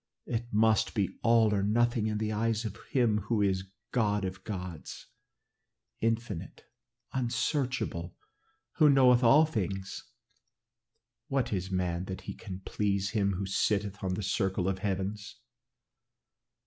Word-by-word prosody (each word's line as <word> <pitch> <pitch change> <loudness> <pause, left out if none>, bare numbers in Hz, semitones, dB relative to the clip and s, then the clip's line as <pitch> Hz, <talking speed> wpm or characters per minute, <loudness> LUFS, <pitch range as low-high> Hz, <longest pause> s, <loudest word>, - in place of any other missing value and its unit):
It 120 0 -3
must 110 +1 +3
be 100 -4 -1
all 115 -2 +4
or 100 - +1
nothing 115 +2 +2
in 105 -1 -1
the 110 0 -1
eyes 110 +1 0
of 105 -2 -4
him 115 -5 +2
who 115 -2 +1
is 95 -1 0 0.2
God 105 -5 +1
of 95 0 -6
gods, 90 -6 -6 0.9
infinite, 115 -5 -2 0.5
unsearchable, 125 - -1 0.6
who 155 -3 +6
knoweth 130 -3 +6
all 140 +7 +7
things. 95 - -3 1.2
What 135 -6 0
is 95 -1 -2
man 90 -1 -1
that 95 0 -6
he - - -6
can 95 -4 -8
please 100 -1 -1
him 100 -3 +1
who 95 +2 -3
sitteth 100 +1 0
on 95 -1 0
the 105 - -4
circle 95 -1 0
of 95 -1 0
the - - -14
heavens?" 100 +1 -3
105 Hz, 135 wpm, -30 LUFS, 95-115 Hz, 1.2 s, all